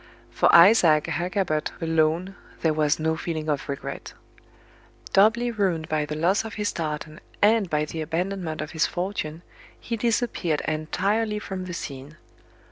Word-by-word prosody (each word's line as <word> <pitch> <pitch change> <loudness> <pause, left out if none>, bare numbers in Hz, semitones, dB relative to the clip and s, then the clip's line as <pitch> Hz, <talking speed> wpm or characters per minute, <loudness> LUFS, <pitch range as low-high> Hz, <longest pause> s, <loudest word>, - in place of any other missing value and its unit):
For - - +3
Isaac 170 -4 +7
Hakkabut 170 -1 -2
alone 165 +3 +1 0.3
there 160 -2 +2
was 150 -1 +2
no 160 +1 0
feeling 160 -1 -4
of 145 -1 -2
regret. 140 - -6 1.0
Doubly 235 +5 +4
ruined 185 -8 -1
by 150 -1 0
the 150 - -4
loss 175 +7 +2
of 225 0 -7
his 210 -1 -1
tartan, 155 -1 -4 0.2
and 210 -2 +3
by 150 -1 0
the 160 +1 -5
abandonment 170 0 -3
of 155 - -6
his 160 -2 +1
fortune, 175 -3 -4 0.4
he 235 - -4
disappeared 220 -8 0
entirely 200 +8 0
from 190 -3 -5
the 180 - -6
scene. 140 0 -7
165 Hz, 145 wpm, -25 LUFS, 155-195 Hz, 1.0 s, Isaac